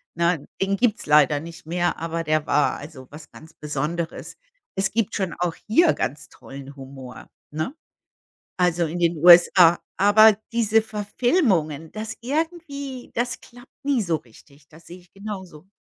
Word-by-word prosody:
Ne, 170 -2 0
den 195 +1 +1
gibt's 235 -1 0
leider 150 -1 +4
nicht 165 +1 -11
mehr, 175 +1 -1
aber 165 0 -3
der 155 -1 0
war, 145 0 +2
also, 145 -4 -11
was 150 +1 -12
ganz 160 0 -15
Besonderes. 150 +3 -4 0.4
Es 195 0 0
gibt 225 0 -1
schon 190 -4 -2
auch 175 -2 -1
hier 325 +10 +4
ganz 145 +4 -4
tollen 140 +1 -12
Humor, 135 -2 -11 0.2
ne? 155 - -4 0.8
Also, 175 -1 +2
in 165 +3 -5
den 170 -1 +1
USA. 175 +1 +7 0.2
Aber 210 +2 +6 0.2
diese 225 -1 +2
Verfilmungen, 205 - 0
das 215 +1 -6
irgendwie 285 -1 -4
das 240 +1 -2
klappt 245 +2 -17
nie 275 -5 +1
so 170 -4 0
richtig. 140 +2 -18
Das 160 +2 -18
sehe 175 - -11
ich 175 0 -26
genauso. 190 -5 -9
175 Hz, 150 wpm, -23 LUFS, 155-220 Hz, 0.8 s, USA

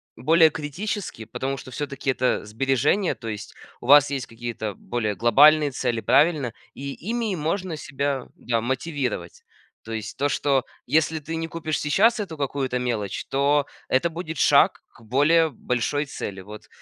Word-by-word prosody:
более 160 +6 +5
критически, 160 - -5
потому 130 +4 -3
что 130 - -10
всё-таки 140 -1 -2
это 125 -4 0
сбережения, 135 - +1
то 115 - -9
есть 105 -1 -6 0.3
у 120 - -8
вас 145 0 +7
есть 135 -3 -3
какие-то 115 -3 -5
более 110 -4 -3
глобальные 145 - +5
цели, 120 -2 -1
правильно? 150 -7 +3 0.2
И 140 0 -5
ими 225 0 -2
можно 170 +2 -2
себя, 140 -3 -3
да, 115 -2 -1
мотивировать. 130 - -3 0.4
То 115 - -9
есть 110 -1 -5
то, 145 +1 +1
что 135 -2 +1 0.2
если 160 +4 +1
ты 160 +2 -6
не 165 0 -3
купишь 160 -2 -3
сейчас 220 +11 +3
эту 165 -6 -6
какую-то, 135 -2 -1
то - - -2
мелочь, 110 -5 -2
то 140 +1 +2 0.2
это 165 +7 +2
будет 160 -2 -6
шаг - - +4
к - - -21
более 150 +8 +3
большой 145 +3 -1
цели, 100 -7 -6
вот. 105 +3 -11
140 Hz, 160 wpm, -24 LUFS, 120-155 Hz, 0.4 s, вас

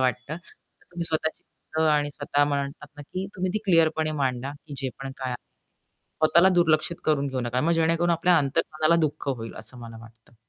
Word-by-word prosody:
वाटतं. 125 +3 -1
तर 175 - -21
तुम्ही 175 -1 -4
स्वतःची 160 -1 -1 0.5
आणि 145 -1 +2
स्वतः 145 0 +1
म्हणतात 140 0 -3
ना 145 - -8
की 185 +6 -5
तुम्ही 185 0 -1
ती - - +2
क्लिअरपणे 160 -3 +3
मांडा 130 0 -1 0.2
की 145 - -7
जे 135 -1 -2
पण 135 0 -5
काय 130 -1 -3
आहे. 125 - -2 0.9
स्वतःला 170 +4 +6
दुर्लक्षित 170 -1 +3
करून 150 -2 +2
घेऊ 130 -1 -2
नका. 120 +1 -1
मग 165 +5 +2
जेणेकरून 165 +1 +2
आपल्या 170 +1 +4
अंतर्मनाला 155 +3 +1
दुःख 150 -2 -1
होईल 115 -4 -3
असं 130 - -6
मला 115 -1 -9
वाटतं. 115 0 -17
150 Hz, 185 wpm, -26 LUFS, 130-165 Hz, 0.9 s, स्वतःला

